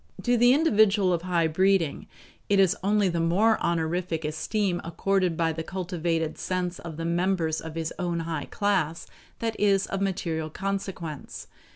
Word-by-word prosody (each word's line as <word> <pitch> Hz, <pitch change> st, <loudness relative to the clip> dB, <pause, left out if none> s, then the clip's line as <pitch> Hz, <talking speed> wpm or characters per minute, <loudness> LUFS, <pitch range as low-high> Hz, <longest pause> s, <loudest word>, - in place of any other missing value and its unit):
To 245 Hz, -, +3 dB
the 245 Hz, +1 st, +5 dB
individual 215 Hz, -, +4 dB
of 170 Hz, -, -1 dB
high 175 Hz, -2 st, +1 dB
breeding, 175 Hz, -1 st, +1 dB, 0.4 s
it 200 Hz, -1 st, +4 dB
is 190 Hz, -3 st, +4 dB
only 205 Hz, 0 st, +3 dB
the 170 Hz, -2 st, -1 dB
more 195 Hz, +7 st, +3 dB
honorific 170 Hz, 0 st, -1 dB
esteem 175 Hz, +4 st, -1 dB
accorded 180 Hz, 0 st, 0 dB
by 165 Hz, -1 st, +1 dB
the 160 Hz, -, -4 dB
cultivated 170 Hz, -3 st, -2 dB
sense 180 Hz, -1 st, -2 dB
of 165 Hz, -3 st, -8 dB
the 165 Hz, -, -4 dB
members 170 Hz, -2 st, 0 dB
of 160 Hz, 0 st, -8 dB
his 165 Hz, -1 st, -3 dB
own 175 Hz, -2 st, -1 dB
high 165 Hz, -2 st, -3 dB
class 185 Hz, -6 st, 0 dB, 0.3 s
that 225 Hz, -1 st, -2 dB
is 200 Hz, -2 st, +3 dB
of 195 Hz, -, -4 dB
material 165 Hz, -5 st, -2 dB
consequence. 190 Hz, -4 st, -5 dB
175 Hz, 160 wpm, -26 LUFS, 165-195 Hz, 0.4 s, the